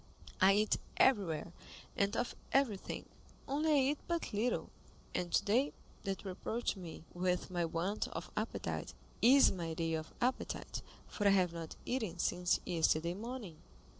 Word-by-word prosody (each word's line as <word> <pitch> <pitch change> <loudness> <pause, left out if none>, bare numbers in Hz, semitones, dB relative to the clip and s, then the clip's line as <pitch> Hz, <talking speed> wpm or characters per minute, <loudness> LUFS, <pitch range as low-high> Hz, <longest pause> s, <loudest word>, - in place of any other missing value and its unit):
I 190 +1 +8
eat 215 +1 +3 0.2
everywhere, 180 - +3 0.4
and 200 0 +1
of 245 - -1 0.2
everything, 250 -8 +1 0.4
only 300 +3 +1
I 275 -2 +5
eat 295 - -2
but 340 -8 -2
little; 225 +4 0 0.4
and 175 -1 -1
today, 250 +8 +3 0.3
that 195 -1 -2
you 195 - -4
reproach 225 +6 -2
me 175 -5 -8
with 180 0 0
my 175 -1 +1
want 170 +5 -1
of - - -6
appetite, - - -3 0.3
is 270 +4 +8
my 165 -3 -3
day 165 0 -1
of 160 0 -3
appetite, 255 +2 -1 0.3
for 205 - 0
I 195 0 +6
have 180 -2 +2
not 165 -1 -6
eaten 220 -9 -2
since 180 0 +2
yesterday 170 -1 +2
morning." 220 -4 -6
195 Hz, 150 wpm, -35 LUFS, 175-245 Hz, 0.4 s, I